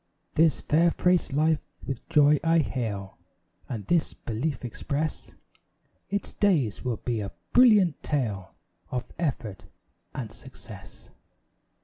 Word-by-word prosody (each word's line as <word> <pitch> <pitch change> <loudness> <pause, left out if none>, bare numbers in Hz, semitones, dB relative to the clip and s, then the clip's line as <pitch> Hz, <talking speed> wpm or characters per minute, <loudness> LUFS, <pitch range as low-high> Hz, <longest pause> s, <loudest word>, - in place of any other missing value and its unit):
This 155 -5 +3
fair 165 +3 +3
fresh 180 -1 +2
life 155 +2 +2 0.2
with 135 -4 -6
joy 150 0 +5
I 165 0 +4
hail, 110 -10 -2 0.5
And 110 -6 -4
this 170 - +1
belief 125 +4 -3
express, 140 +6 -3 0.8
Its 200 +1 -3
days 155 - +1
will 125 -3 -1
be 120 -3 -2
a 100 -1 -5 0.2
brilliant 210 - +6
tale 105 -10 -2 0.3
Of 125 0 -2 0.2
effort 125 - -3 0.5
and 115 -5 -4
success. 105 -6 -13
140 Hz, 115 wpm, -27 LUFS, 115-160 Hz, 0.8 s, brilliant